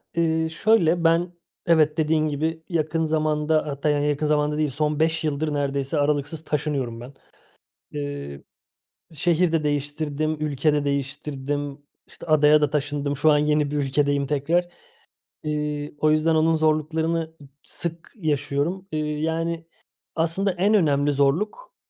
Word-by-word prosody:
Eee, 160 -1 +1
şöyle, 170 -2 +2
ben 170 +2 +2 0.3
evet, 155 -3 +3
dediğin 155 0 +2
gibi 160 +2 -2
yakın 165 -1 0
zamanda, 155 0 +1
hatta, 140 +1 -1
yani, 145 0 +1
yakın 150 +1 0
zamanda 150 0 +1
değil, 155 -1 +1
son 150 +2 -1
5 160 +1 +1
yıldır 155 0 -1
neredeyse 140 0 -1
aralıksız 145 +2 0
taşınıyorum 140 -7 -2
ben. 125 +3 -10 0.8
Eee, 145 - -5 0.7
şehir 170 +2 +1
de 160 -2 +1
değiştirdim, 145 +1 -1
ülke 150 0 +1
de 145 -1 0
değiştirdim, 140 0 -3 0.3
işte, - - -12
adaya 150 -1 +5
da 150 -2 +1
taşındım. 145 -1 -2
Şu 155 +3 +4
an 150 - +4
yeni 150 -1 +1
bir 150 - -2
ülkedeyim 140 0 +1
tekrar. 155 +5 0 0.8
İii, 150 -1 -3
o 155 - +3
yüzden 155 +1 +2
onun 160 +1 +3
zorluklarını 160 +1 0 0.3
sık 170 0 -5
yaşıyorum. 160 - -1
İii, 150 -1 -2
yani, 165 +1 -2 0.5
aslında 170 +5 +1
en 190 +4 +1
önemli 145 -7 +3
zorluk 180 - 0
150 Hz, 135 wpm, -24 LUFS, 145-160 Hz, 0.8 s, adaya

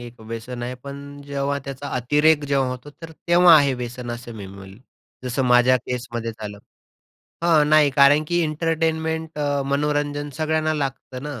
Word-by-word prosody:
एक 120 -1 -11
व्यसन 115 +2 -7
आहे. 125 +1 -4
पण 140 +2 -10
जेव्हा 140 0 -2
त्याचा 140 +1 -6
अतिरेक 150 +4 +3
जेव्हा 135 -2 +1
होतो 125 +3 -7
तर 165 - -8
तेव्हा 175 +1 +5
आहे 140 -3 +3
व्यसन 125 0 -6
असं 120 0 -7
मी 100 -2 -8
बोलेल. 95 +1 -12 0.5
जसं 125 +2 -1
माझ्या 125 +1 +5
केसमध्ये 120 -2 -5
झालं. 105 -2 -8 0.9
हां, 155 -3 +4
नाही 155 -2 +5
कारण 140 +2 +5
की 175 - +1
एंटरटेनमेंट 160 0 -1
अ, 145 -1 0
मनोरंजन 145 +1 -1
सगळ्यांना 155 0 0
लागतं 135 -2 -4
ना. 145 -5 -6
140 Hz, 160 wpm, -22 LUFS, 125-150 Hz, 0.9 s, तेव्हा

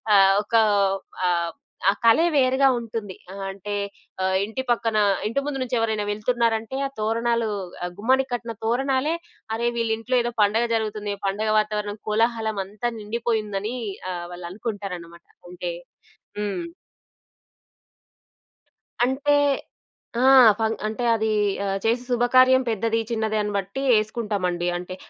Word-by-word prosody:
ఆహ్, 195 0 +7
ఒకా 225 +1 +3 0.7
ఆహ్, 170 -1 0 0.4
ఆ - - +6
కలే 230 +9 +6
వేరుగా 265 0 +4
ఉంటుంది. 220 -4 -6 0.2
ఆహ్, 195 0 -6
అంటే 200 +1 -6 0.5
ఆహ్, 190 0 +1
ఇంటి 240 +5 -4
పక్కన 225 -2 +1 0.3
ఇంటి 275 +4 0
ముందు 270 -2 -3
నుంచెవరైనా 225 -4 0
వెళ్తున్నారంటే, 230 +2 0
ఆ - - -10
తోరణాలూ, 230 +1 +1 0.4
ఆ - - -1
గుమ్మానికి 260 +3 +2
కట్టిన 235 -2 -4
తోరణాలే, 270 +6 +1 0.4
అరే! 235 +1 0
వీళ్ళింట్లో 230 +2 0
ఏదో 240 0 -2
పండగ 220 +4 +2
జరుగుతుంది. 210 -2 -2
పండగ 215 +2 -1
వాతావరణం, 210 0 -2
కోలాహలం 220 -1 +1
అంతా 210 +4 -3
నిండిపోయుందని 215 0 -2 0.4
అహ్, 175 -1 -4
వాళ్ళనుకుంటారనమాట. 180 -2 -6 0.2
అంటే 180 -1 -4 0.7
హ్మ్. 210 - -3 2.4
అంటే, 280 +3 +2 0.9
ఆ! - - +3 0.4
ఫంగ్ 220 0 0
అంటే 220 +3 -4
అదీ 220 0 0 0.3
ఆహ్, 195 0 0
చేసే 240 +2 +1
శుభకార్యం 255 +2 +5
పెద్దది, 225 +1 0
చిన్నది 220 -1 0
అని 210 0 -2
బట్టి 200 +7 -4 0.2
ఏసుకుంటామండి. 205 -5 -2
అంటే 180 +1 -7
220 Hz, 120 wpm, -24 LUFS, 205-240 Hz, 2.4 s, ఆహ్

